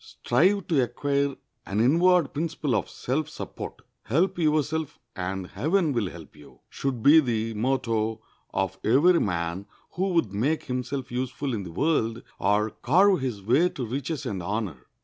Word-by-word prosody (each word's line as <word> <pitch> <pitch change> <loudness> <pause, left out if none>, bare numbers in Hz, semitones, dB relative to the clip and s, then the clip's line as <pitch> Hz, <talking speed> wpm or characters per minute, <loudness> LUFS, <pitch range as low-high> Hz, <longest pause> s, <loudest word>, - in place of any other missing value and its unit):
Strive 185 +9 +1
to 155 -6 +2
acquire 140 +3 0 0.3
an 100 - -2
inward 170 +6 +4
principle 155 -3 -2
of 100 - -1
self 140 +5 -2
support. - - -8 0.2
Help 170 +10 +1
yourself 155 -1 0 0.2
and 95 0 -3
heaven 160 - 0
will 110 -6 0
help 85 -3 -12
you, 75 -1 -17
should 130 -5 -3
be 150 +3 +8
the 115 -5 -1
motto 115 -2 0 0.3
of - - -2
every 165 +9 +5
man 85 +1 -2 0.2
who 190 +2 -1
would 140 - +1
make 140 +10 0
himself 130 +1 -4
useful 130 +2 -3
in 110 - -2
the 90 -3 -8
world 115 - 0 0.2
or 105 +3 +2
carve 185 - +3
his 120 -7 -3
way 135 - +3
to 130 - -5
riches 140 +5 -4
and 95 -3 -3
honor. 95 - -4
130 Hz, 155 wpm, -26 LUFS, 110-155 Hz, 0.3 s, be